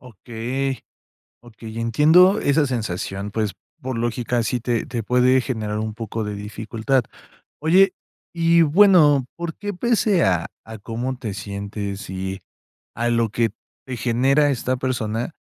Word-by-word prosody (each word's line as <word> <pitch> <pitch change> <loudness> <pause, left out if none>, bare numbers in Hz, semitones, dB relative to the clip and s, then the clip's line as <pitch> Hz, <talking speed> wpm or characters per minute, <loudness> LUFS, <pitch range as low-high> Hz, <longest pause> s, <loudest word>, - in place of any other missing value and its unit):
Okey. 125 +4 -4 0.6
Okey, 115 -1 -9
entiendo 160 - +5
esa 145 +1 +2
sensación. 105 -4 -3
Pues, 110 -2 -1 0.3
por 130 -2 -4
lógica, 120 +1 -1
sí 120 +3 -1
te 120 -2 -1
te 120 -3 -4
puede 125 +3 +3
generar 110 -4 -3
un 110 0 -3
poco 115 0 -4
de 105 -1 -4
dificultad. 110 +5 -2 0.6
Oye, 185 +5 +4 0.4
y 170 0 +4
bueno, 155 -5 +5
¿por 170 -1 -4
qué 205 0 -4
pese 210 -2 +2
a 90 -3 +1 0.2
a 110 -1 -9
cómo 120 +5 -4
te 120 -5 -5
sientes 100 -1 -6
y, 95 0 -5 0.5
a 120 +2 -1
lo 115 -1 +2
que 115 0 0 0.4
te 130 -2 -5
genera 130 +5 +2
esta 130 -1 -1
persona, 120 -1 -2
120 Hz, 140 wpm, -22 LUFS, 110-140 Hz, 0.6 s, entiendo